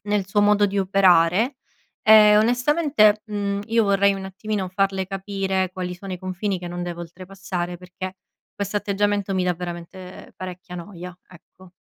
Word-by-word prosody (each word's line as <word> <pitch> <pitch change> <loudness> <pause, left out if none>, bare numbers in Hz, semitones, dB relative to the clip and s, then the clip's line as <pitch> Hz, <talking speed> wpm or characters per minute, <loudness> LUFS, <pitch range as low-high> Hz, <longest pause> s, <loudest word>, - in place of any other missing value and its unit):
nel 205 -2 0
suo 205 +1 +2
modo 205 0 +4
di 200 0 -2
operare, 190 - +3 0.5
e 215 -1 +7
onestamente, 245 -2 +3
mhmm, 200 -1 -2
io 230 0 +2
vorrei 200 0 +3
un 195 0 -6
attimino 195 0 -4
farle 190 0 0
capire 195 -1 -2
quali 180 -1 -4
sono 190 +1 -8
i 180 - -5
confini 185 +1 -3
che 175 - -6
non 175 0 -5
deve 175 -1 -6
oltrepassare, 180 0 -6
perché 185 +1 -8 0.4
questo 200 0 -3
atteggiamento 205 -1 -1
mi 185 - +1
dà 180 - +2
veramente 180 +1 -9
parecchia 180 -1 -8
noia, 180 0 -9
ecco. 180 +1 -18
195 Hz, 155 wpm, -23 LUFS, 180-205 Hz, 0.5 s, e